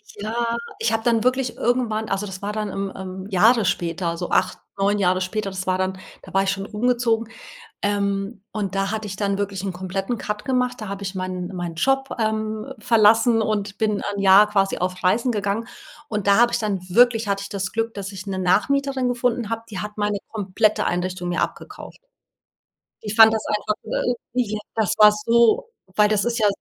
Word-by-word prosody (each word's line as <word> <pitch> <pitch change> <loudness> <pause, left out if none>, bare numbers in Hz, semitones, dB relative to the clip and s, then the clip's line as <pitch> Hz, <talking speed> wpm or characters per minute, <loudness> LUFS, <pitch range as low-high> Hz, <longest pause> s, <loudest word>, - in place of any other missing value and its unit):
Ja, 230 +3 -2 0.2
ich 450 - +1
habe 225 0 0
dann 230 -1 +2
wirklich 255 -1 0
irgendwann 230 -3 0
also, 195 +1 -1
das 190 -2 -8
war 205 +1 -3
dann, 215 -1 -2
ähm, 195 0 -4
ähm, 190 0 -7
Jahre 220 +3 +4
später, 170 -1 -1
so 175 0 -4
8, 185 - +1 0.2
9 205 +1 +2
Jahre 185 0 +2
später. 200 +2 -2
Das 190 0 -6
war 185 0 +2
dann 185 0 -2 0.2
da 190 - -14
war 195 - +3
ich 195 - 0
schon 195 0 -4
umgezogen, 230 +1 0 0.6
ähm, 200 0 -1
und 200 -3 -3
da 195 0 0
hatte 220 0 -3
ich 195 -2 -6
dann 200 -1 -1
wirklich 200 -2 -3
'n 195 -2 -3
kompletten 195 +5 -3
Cut 210 0 -4
gemacht, 250 -1 0
da 215 - -6
habe 200 0 -6
ich 195 0 -4
meinen 185 0 -4
meinen 175 -2 -5
Job, 270 +9 +1
ähm, 215 0 -1
verlassen 225 +1 +4
und 205 -2 -2
bin 210 -2 0
'n 200 0 -3
Jahr 200 +2 +7
quasi 195 -2 +1
auf 180 0 -3
Reisen 230 +7 +2
gegangen 210 0 -2 0.4
und 210 -3 -3
da 200 0 +5
habe 240 0 +5
ich 235 - +1
dann 210 -4 -1
wirklich 230 +1 +4
hatte 200 0 0
ich 200 - -7
das 195 -2 -3
Glück, 225 0 -2
dass 200 -1 -5
ich 190 0 -8
'ne 195 -1 -3
Nachmieterin 260 +8 +1
gefunden 240 -2 -1
habe, 230 0 -2
die 195 - -6
hat 210 +1 -6
meine 205 -1 0
komplette 210 0 +1
Einrichtung 180 0 -2
mir 175 - 0
abgekauft. - - -6 1.0
Ich 210 -1 -5
fand 220 0 +8
das 220 -1 -1
einfach, 210 0 -1
äh, 245 - -1 0.2
ja 215 -4 0 0.2
das 220 -5 +1
war 210 0 +8
so 235 - +3 0.3
weil, 210 0 +5
das 210 -1 +1
ist 240 0 -1
ja 215 - +3
210 Hz, 205 wpm, -22 LUFS, 195-225 Hz, 1.0 s, fand